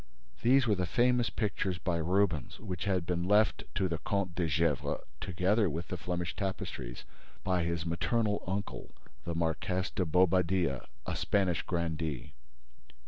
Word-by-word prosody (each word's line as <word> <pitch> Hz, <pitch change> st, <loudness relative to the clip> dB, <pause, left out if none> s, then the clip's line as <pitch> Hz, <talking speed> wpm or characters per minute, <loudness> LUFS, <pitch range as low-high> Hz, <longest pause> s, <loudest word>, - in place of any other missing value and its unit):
These 130 Hz, +2 st, +5 dB
were 110 Hz, -, +3 dB
the 90 Hz, -3 st, 0 dB
famous 125 Hz, +1 st, +3 dB
pictures 100 Hz, -4 st, -1 dB
by 85 Hz, -1 st, -1 dB
Rubens 85 Hz, -3 st, +1 dB
which 90 Hz, -5 st, -4 dB
had 95 Hz, -4 st, +1 dB
been 85 Hz, -1 st, 0 dB
left 105 Hz, +2 st, +4 dB
to 95 Hz, -, +2 dB
the 85 Hz, -3 st, -2 dB
Comte 95 Hz, +2 st, -1 dB
de 85 Hz, -1 st, 0 dB
Gesvres, 80 Hz, +2 st, +1 dB, 0.2 s
together 95 Hz, +3 st, +2 dB
with 80 Hz, 0 st, -4 dB
the -, -, -2 dB
Flemish 90 Hz, -1 st, -3 dB
tapestries, 65 Hz, -10 st, -4 dB, 0.4 s
by 90 Hz, -2 st, +1 dB
his 85 Hz, 0 st, -1 dB
maternal 105 Hz, +5 st, 0 dB
uncle, 100 Hz, +2 st, -4 dB, 0.3 s
the 85 Hz, -1 st, -2 dB
Marqués 85 Hz, +3 st, -1 dB
de 95 Hz, -, +1 dB
Bobadilla, 90 Hz, -3 st, +2 dB, 0.2 s
a -, -, -2 dB
Spanish 95 Hz, -4 st, +1 dB
grandee. 80 Hz, -5 st, -2 dB
90 Hz, 145 wpm, -32 LUFS, 85-100 Hz, 0.4 s, These